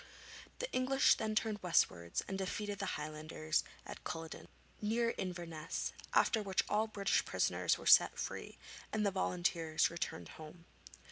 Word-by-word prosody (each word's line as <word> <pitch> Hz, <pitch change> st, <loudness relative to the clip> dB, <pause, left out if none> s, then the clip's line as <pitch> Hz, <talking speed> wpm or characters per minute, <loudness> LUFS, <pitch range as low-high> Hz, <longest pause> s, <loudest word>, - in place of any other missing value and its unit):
The -, -, -4 dB
English 265 Hz, +1 st, +4 dB
then 215 Hz, -1 st, -2 dB
turned 215 Hz, -2 st, 0 dB
westwards 90 Hz, -, +1 dB
and 195 Hz, -, -3 dB
defeated 200 Hz, +1 st, -3 dB
the 200 Hz, -, -2 dB
Highlanders 155 Hz, +1 st, -2 dB, 0.2 s
at -, -, -9 dB
Culloden, 165 Hz, -1 st, -6 dB, 0.3 s
near 230 Hz, +2 st, +1 dB
Inverness, 170 Hz, -4 st, -4 dB, 0.2 s
after 225 Hz, -, +4 dB
which 195 Hz, -2 st, +1 dB
all 215 Hz, +1 st, +1 dB
British 200 Hz, -2 st, +1 dB
prisoners -, -, +1 dB
were -, -, -11 dB
set -, -, +7 dB
free, -, -, -5 dB, 0.3 s
and 215 Hz, -1 st, 0 dB
the 200 Hz, -, +2 dB
volunteers 175 Hz, -4 st, +1 dB
returned 90 Hz, -, -4 dB
home. 160 Hz, +2 st, -11 dB
185 Hz, 140 wpm, -35 LUFS, 160-215 Hz, 0.3 s, set